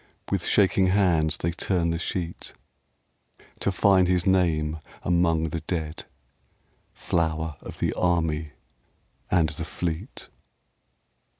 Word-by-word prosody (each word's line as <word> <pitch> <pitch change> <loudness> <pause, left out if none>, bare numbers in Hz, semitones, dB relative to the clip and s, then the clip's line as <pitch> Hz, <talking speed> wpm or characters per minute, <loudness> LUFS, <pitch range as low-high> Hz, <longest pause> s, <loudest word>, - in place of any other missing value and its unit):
With - - 0
shaking 95 -2 +4
hands 85 -6 +2
they 85 - -1
turn 85 0 0
the 85 - -2
sheet 85 -1 -4 1.1
To 100 - +1
find 95 -1 +4
his 90 -1 +1
name 80 -5 +2 0.2
among 85 -2 +2
the 80 - -3
dead, 80 -3 -4 0.9
Flower 80 -2 -1
of - - -9
the - - 0
Army 80 -4 0 0.8
and 85 -4 +3
the 80 +2 -6
Fleet. 85 - -5
85 Hz, 110 wpm, -26 LUFS, 80-90 Hz, 1.1 s, shaking